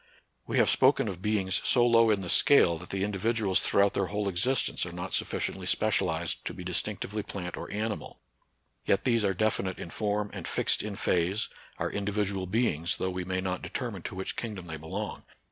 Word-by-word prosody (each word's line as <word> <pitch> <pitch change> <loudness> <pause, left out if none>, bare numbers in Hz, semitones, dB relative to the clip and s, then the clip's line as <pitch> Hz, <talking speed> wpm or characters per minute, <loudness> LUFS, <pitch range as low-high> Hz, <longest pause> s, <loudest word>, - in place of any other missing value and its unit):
We - - -1
have - - +5
spoken - - +4
of 90 -2 -5
beings 100 -3 +1
so 120 -2 +5
low 115 -1 +5
in 105 -2 +2
the 90 - -5
scale 85 - +5
that 90 - -11
the 95 0 -1
individuals 105 0 +1
through 100 - +3
out 100 - +2
their 95 - 0
whole 105 +1 -2
existence 115 +8 +1
are 85 - -4
not 90 +2 -6
sufficiently - - -1
specialized 90 -6 +1
to - - -4
be - - -7
distinctively 105 +1 -1
plant 90 -4 -5
or - - -7
animal: 105 +1 -4 0.6
yet 100 - +1
these 115 -4 +2
are 95 -2 +1
definite 95 -2 0
in 85 - -7
form 105 -1 -1
and - - -6
fixed - - +2
in 105 -1 -5
phase, 95 +4 0 0.3
are - - -2
individual 100 -2 -1
beings, 90 -6 0
though 95 - -1
we 90 0 -4
may 95 0 -1
not 90 -1 -2
determine - - -4
to - - -6
which 95 0 -4
kingdom 105 -6 -5
they 80 -2 -6
belong. 80 +1 -5
100 Hz, 195 wpm, -29 LUFS, 90-105 Hz, 0.6 s, have